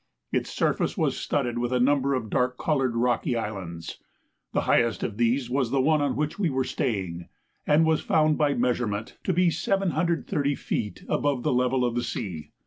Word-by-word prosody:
Its - - -1
surface - - 0
was - - +1
studded 120 -4 -1
with 120 0 -1
a 125 - +2
number 140 +1 +3
of 115 -5 -4
dark 125 0 +1
coloured 135 -6 0
rocky 120 +1 +1
islands. 95 -7 -5 0.5
The - - +1
highest 115 -2 +2
of 105 - -3
these 120 +2 +1
was 130 -1 0
the 135 +2 +1
one 150 +3 +3
on 140 -2 0
which 150 +6 -2
we 185 -5 +2
were 130 -1 0
staying, 95 -10 -3 0.4
and 150 +2 +5
was 160 -1 +2
found 155 -1 +3
by 145 -2 +2
measurement 120 -3 -1
to - - +2
be 180 0 +3
730 165 -5 0
feet 105 -5 -4
above 140 -4 0
the - - +1
level 125 0 +2
of 120 - 0
the 120 - 0
sea. 85 -11 -5
125 Hz, 185 wpm, -26 LUFS, 115-145 Hz, 0.5 s, and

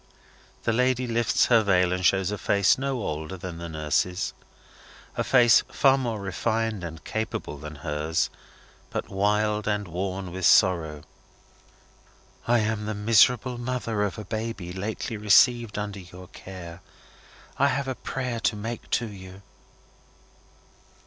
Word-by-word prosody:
The 115 - +1
lady 125 +1 +2
lifts 115 -1 +2
her 115 -2 +5
veil, 90 -3 +2
and 90 0 -2
shows 95 +1 +3
a 105 - -3
face 100 -1 +3
no 135 -4 -2
older 80 +3 -4
than 85 -1 -7
the 85 0 -6
nurse's. 80 +4 -1 0.8
A - - 0
face 120 -3 +6
far 135 -1 +4
more 120 -5 -2
refined 105 +2 -2
and 80 -2 -7
capable 110 -9 -4
than 75 +1 -8
hers, 75 +2 -1 0.6
but - - -4
wild 105 +1 +1
and 105 -1 -1
worn 95 +1 -4
with 95 0 +1
sorrow. 80 -5 +3 1.4
"I 120 -1 +4
am 105 -1 -2
the 110 - -2
miserable 115 +3 +3
mother 120 -3 -2
of 100 0 -1
a 105 - -7
baby 110 -4 -4
lately 105 +3 -4
received 110 +2 +4
under 105 -1 -4
your 90 0 -12
care. 90 -2 -10 0.8
I 140 - +5
have 140 0 -1
a 130 - -1
prayer 125 -2 -4
to 110 - +1
make 115 +3 -6
to 120 - +1
you." 95 -2 -11
105 Hz, 140 wpm, -26 LUFS, 90-115 Hz, 1.4 s, face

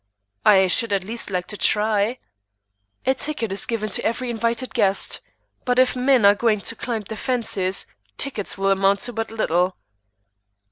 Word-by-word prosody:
"I 190 -2 +6
should 205 +4 +1
at 195 -2 0
least 225 +4 -4
like 180 -2 -2
to 210 - -7
try." 215 +3 +1 0.9
"A 265 - +3
ticket 265 -6 -2
is 195 0 0
given 225 -2 -2
to - - -2
every 240 +2 -1
invited 235 +2 -2
guest; 195 0 +1 0.4
but 250 -1 0
if 255 0 +4
men 255 -3 +3
are 200 - +8
going 215 -1 +1
to 230 - -5
climb 235 -3 -3
the 220 +2 -7
fences, 215 -6 -1 0.3
tickets 235 -10 -2
will 195 0 +1
amount 195 +1 +2
to 245 0 -3
but 225 0 -3
little." 185 -4 0
220 Hz, 170 wpm, -22 LUFS, 195-240 Hz, 0.9 s, are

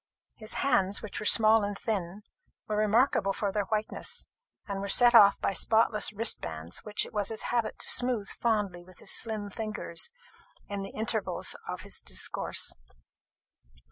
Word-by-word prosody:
His 215 0 -6
hands, 200 -7 +2
which 215 - -6
were 210 - -2
small 220 0 +6
and 205 0 -3
thin, 200 -2 -4 0.4
were 215 - -2
remarkable 215 -1 +2
for 200 -1 -2
their 205 0 -1
whiteness, 215 +1 -2 0.4
and 200 -1 -4
were 200 - -4
set 240 +4 +6
off 205 -4 +7
by - - -1
spotless 220 0 +2
wristbands, 85 - -2
which 210 -1 -1
it - - -13
was 205 -2 -1
his 220 -1 -2
habit 235 -3 -1
to - - -2
smooth 245 -5 +2
fondly 205 -6 -1
with 185 0 -16
his - - -2
slim 215 -3 -1
fingers 215 - -4 0.6
in 200 -1 -5
the 195 - -6
intervals 220 -1 -2
of - - -5
his - - -1
discourse. - - -1
210 Hz, 160 wpm, -29 LUFS, 195-220 Hz, 0.6 s, off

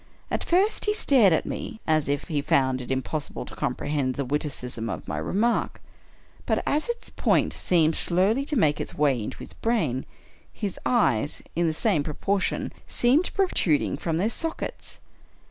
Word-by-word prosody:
At - - -1
first 380 +5 +2
he 420 0 +2
stared 255 - +5
at 160 - +2
me 220 - -5
as 155 -3 +2
if 145 0 0
he 150 -4 -2
found 130 -2 +2
it 125 - -9
impossible 135 +3 -3
to - - -10
comprehend 140 -3 -1
the 140 - -2
witticism 125 -5 -3
of - - -5
my 75 - -3
remark; 215 - 0 0.7
but - - +1
as 300 +9 0
its 475 0 -4
point - - +2
seemed 165 -3 +2
slowly 195 +12 +1
to 300 - -2
make 150 - +2
its - - -6
way 140 -5 +2
into 105 - -5
his - - -10
brain, 160 - -1 0.4
his 205 -4 -4
eyes, 145 - +1
in 170 +1 +2
the - - +2
same 155 -1 +1
pro 150 0 -5
portion, 200 -1 -1
seemed 275 +9 +3
protruding 275 - +2
from 165 -2 -2
their 200 +6 +1
sockets. 325 +4 -4
160 Hz, 170 wpm, -26 LUFS, 140-235 Hz, 0.7 s, stared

